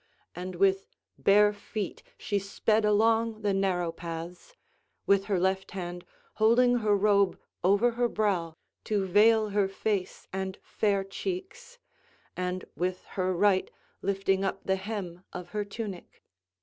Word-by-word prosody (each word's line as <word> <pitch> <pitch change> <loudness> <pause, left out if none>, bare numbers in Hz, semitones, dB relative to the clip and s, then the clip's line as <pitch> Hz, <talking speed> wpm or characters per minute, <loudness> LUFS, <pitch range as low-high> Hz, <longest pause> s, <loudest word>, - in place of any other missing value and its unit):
And 180 +1 -5
with 195 +1 +2 0.3
bare 205 +1 +5
feet 205 -1 -5 0.2
she 205 -1 -1
sped 215 +2 +1
along 225 +1 +2
the 205 -1 +2
narrow 185 -3 0
paths, 170 - -8 0.5
with 200 0 +3
her 195 -3 0
left 190 +1 0
hand 175 -1 -5 0.4
holding 245 +3 +5
her 210 -3 +2
robe 200 -2 +3 0.2
over 200 +6 +4
her 240 +1 +1
brow 185 -7 0 0.3
to 205 -3 0
veil 215 +3 +4
her 200 -1 +2
face 195 0 -3
and 190 0 -3
fair 200 -2 0
cheeks, 390 - -6 0.6
and 180 0 -3
with 180 +1 -2
her 185 -1 0
right 190 0 +3 0.3
lifting 195 0 +1
up 195 0 -2
the 190 0 +1
hem 190 -3 -5
of 180 -1 -7
her 210 +1 -2
tunic. 200 -3 -7
200 Hz, 135 wpm, -28 LUFS, 185-215 Hz, 0.6 s, bare